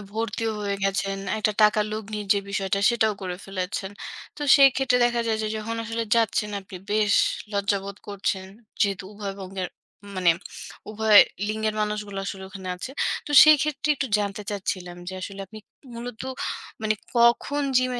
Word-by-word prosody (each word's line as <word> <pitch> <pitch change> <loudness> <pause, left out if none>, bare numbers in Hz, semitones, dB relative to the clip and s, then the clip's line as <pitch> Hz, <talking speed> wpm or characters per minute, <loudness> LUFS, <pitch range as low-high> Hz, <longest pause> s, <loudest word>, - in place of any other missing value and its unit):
ভর্তিও 225 0 -2
হয়ে 200 -1 -1
গেছেন, 195 0 0 0.2
একটা 215 0 +1
টাকার 210 0 +5
লগ্নীর 210 -1 -5
যে 200 - +1
বিষয়টা 195 0 0
সেটাও 220 -3 +2
করে 180 -1 -4
ফেলেছেন। 190 0 -4 0.5
তো 295 - -6
সেই 275 -1 +8
ক্ষেত্রে 255 -2 +2
দেখা 240 0 +1
যায় 220 -1 0
যে 215 - -1
যখন 225 +1 -4
আসলে 230 0 -2
যাচ্ছেন 220 -2 +1
আপনি 190 -1 -11
বেশ 210 -1 +2 0.4
লজ্জা 200 0 +1
বোধ 200 0 -7
করছেন। 195 -1 -2 0.3
যেহেতু 195 -2 +1
উভয়বঙ্গের 195 -2 -5 0.5
মানে 180 -2 +4 0.6
উভয় 215 -1 +7 0.3
লিঙ্গের 215 0 -1
মানুষগুলো 210 -2 -3
আসলে 190 -1 -5
ওখানে 190 -1 -8
আছে। 255 - -6 0.4
তো - - -7
সেই 310 -1 +8
ক্ষেত্রে 300 0 -2
একটু 270 - -1
জানতে 205 0 -3
চাচ্ছিলাম, 185 -3 -4
যে 190 - -6
আসলে 195 +1 -7
আপনি 220 +2 -11 0.4
মূলত 235 0 -7 0.6
মানে 215 0 +2 0.2
কখন 240 +5 +3
জিম 255 0 +2
210 Hz, 155 wpm, -25 LUFS, 195-225 Hz, 0.6 s, সেই